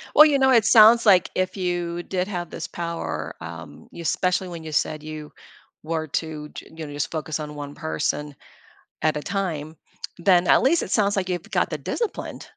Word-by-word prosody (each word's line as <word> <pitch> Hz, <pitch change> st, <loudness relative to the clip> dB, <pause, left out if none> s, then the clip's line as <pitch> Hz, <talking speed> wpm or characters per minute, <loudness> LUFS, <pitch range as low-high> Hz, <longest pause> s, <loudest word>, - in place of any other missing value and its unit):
Well, 305 Hz, -, +10 dB
you 285 Hz, -3 st, +3 dB
know, 265 Hz, 0 st, +4 dB
it 230 Hz, -4 st, +5 dB
sounds, 230 Hz, +1 st, +7 dB
like, 190 Hz, -4 st, +5 dB
if 185 Hz, 0 st, -1 dB
you 175 Hz, -1 st, -2 dB
did 185 Hz, -1 st, -2 dB
have 175 Hz, -4 st, -4 dB
this 165 Hz, -, -6 dB
power, 170 Hz, -1 st, -4 dB
um, -, -, -9 dB
you 170 Hz, -, -9 dB
especially 180 Hz, +3 st, 0 dB
when 170 Hz, -2 st, -8 dB
you 155 Hz, -, -7 dB
said 155 Hz, +1 st, -1 dB
you 155 Hz, -1 st, -8 dB, 0.5 s
were 160 Hz, 0 st, -2 dB
to 150 Hz, 0 st, -4 dB
j -, -, -10 dB
you 160 Hz, -1 st, -6 dB
know, 145 Hz, -, -8 dB
just 145 Hz, -2 st, -3 dB
focus 155 Hz, -1 st, -3 dB
on 150 Hz, -1 st, -6 dB
one 145 Hz, 0 st, -7 dB
person 140 Hz, -, -3 dB, 0.7 s
at 155 Hz, -1 st, +2 dB
a 150 Hz, -, -3 dB
time, 160 Hz, -6 st, -3 dB, 0.4 s
then 175 Hz, 0 st, +4 dB
at -, -, +6 dB
least 315 Hz, +6 st, +3 dB
it -, -, -5 dB
sounds, 205 Hz, -2 st, +2 dB
like, 185 Hz, -1 st, -1 dB
you've 175 Hz, -2 st, -4 dB
got -, -, +1 dB
the -, -, -3 dB
disciplined. 465 Hz, -3 st, -4 dB
170 Hz, 200 wpm, -24 LUFS, 155-190 Hz, 0.7 s, Well